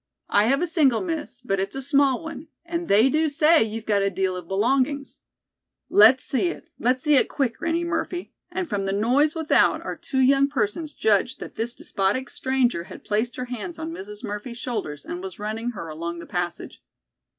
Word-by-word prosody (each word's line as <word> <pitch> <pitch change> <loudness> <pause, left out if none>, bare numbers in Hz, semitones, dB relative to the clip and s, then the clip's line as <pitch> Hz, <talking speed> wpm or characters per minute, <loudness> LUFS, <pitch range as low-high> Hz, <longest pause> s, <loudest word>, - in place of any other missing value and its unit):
"I 205 +1 +5
have 275 +7 +2
a - - +3
single, 305 -8 +3
Miss, 320 -7 -4
but 195 -5 0
it's 195 +4 -3
a 270 - -3
small 280 0 +2
one, 320 -1 -7 0.2
and 340 0 -3
they 215 +5 +5
do 310 +3 +2
say 310 +2 +4
you've 225 0 -2
got 205 -2 +2
a 195 - +2
deal 190 -1 -1
of 180 -2 -7
belongings." 265 - 0 0.7
"Let's 225 +5 +7
see 275 +7 0
it. 345 - -6
Let's 255 +2 +1
see 300 -2 +5
it, - - +3
quick, 250 -5 -1
Granny 335 +1 0
Murphy," 350 +1 -3 0.2
and 360 0 -3
from 205 -6 -2
the 195 - 0
noise 255 +10 +2
without 320 -2 +3
our - - -3
two 270 - -5
young 275 +1 +5
persons 290 +4 -2
judged 220 +4 +1
that - - -8
this 235 +2 -3
despotic 200 +7 -1
stranger 255 -9 0
had - - -11
placed 220 +3 -1
her 250 - -4
hands 250 +8 -6
on 320 0 -5
Mrs. 210 -2 -8
Murphy's 210 +3 -5
shoulders 155 - -4
and 175 - -5
was 190 -1 -7
running 220 +3 -3
her 165 - -5
along 170 +2 -5
the 170 - -8
passage. 175 -1 -4
250 Hz, 200 wpm, -24 LUFS, 205-295 Hz, 0.7 s, Let's